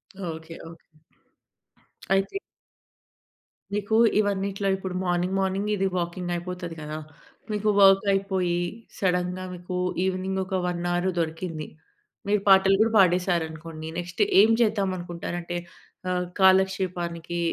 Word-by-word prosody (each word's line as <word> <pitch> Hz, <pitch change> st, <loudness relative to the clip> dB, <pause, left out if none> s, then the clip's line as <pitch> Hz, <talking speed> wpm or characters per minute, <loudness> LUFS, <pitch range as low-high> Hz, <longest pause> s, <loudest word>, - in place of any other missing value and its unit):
Okay. 190 Hz, -2 st, -6 dB, 0.4 s
Okay. 165 Hz, -, -12 dB, 1.4 s
అయితే 195 Hz, -, +1 dB, 1.4 s
మీకు 210 Hz, +1 st, 0 dB, 0.2 s
ఇవన్నిట్లో 200 Hz, -1 st, -1 dB
ఇప్పుడు 190 Hz, -1 st, -5 dB
మార్నింగ్, 180 Hz, +1 st, 0 dB
మార్నింగ్ 195 Hz, +1 st, 0 dB
మీది 195 Hz, -2 st, +1 dB
వాకింగ్ 175 Hz, +1 st, -3 dB
అయిపోతది 175 Hz, -1 st, -5 dB
కదా! 155 Hz, 0 st, -5 dB, 0.5 s
మీకు 210 Hz, 0 st, 0 dB
వర్క్ 195 Hz, 0 st, +6 dB
అయిపోయి, 190 Hz, -3 st, 0 dB, 0.4 s
సడన్‍గా 180 Hz, -1 st, 0 dB
మీకు 180 Hz, +1 st, -6 dB, 0.3 s
ఈవెనింగ్ 190 Hz, 0 st, -1 dB
ఒక 190 Hz, 0 st, -3 dB
1 175 Hz, -1 st, -2 dB
అవర్ 175 Hz, +1 st, +1 dB
దొరికింది. 165 Hz, -1 st, -3 dB, 0.6 s
మీరు 205 Hz, 0 st, +2 dB
పాటలు 195 Hz, 0 st, +6 dB
కూడా 225 Hz, +1 st, +3 dB
పాడేశారనుకోండి. 165 Hz, -3 st, 0 dB
నెక్స్ట్ 175 Hz, 0 st, -4 dB, 0.2 s
ఏం 220 Hz, -, +5 dB
చేద్దామనుకుంటారంటే 175 Hz, -5 st, -2 dB, 0.5 s
ఆహ్, 180 Hz, 0 st, 0 dB
కాలక్షేపానికి 180 Hz, -3 st, +2 dB
185 Hz, 105 wpm, -26 LUFS, 175-195 Hz, 1.4 s, వర్క్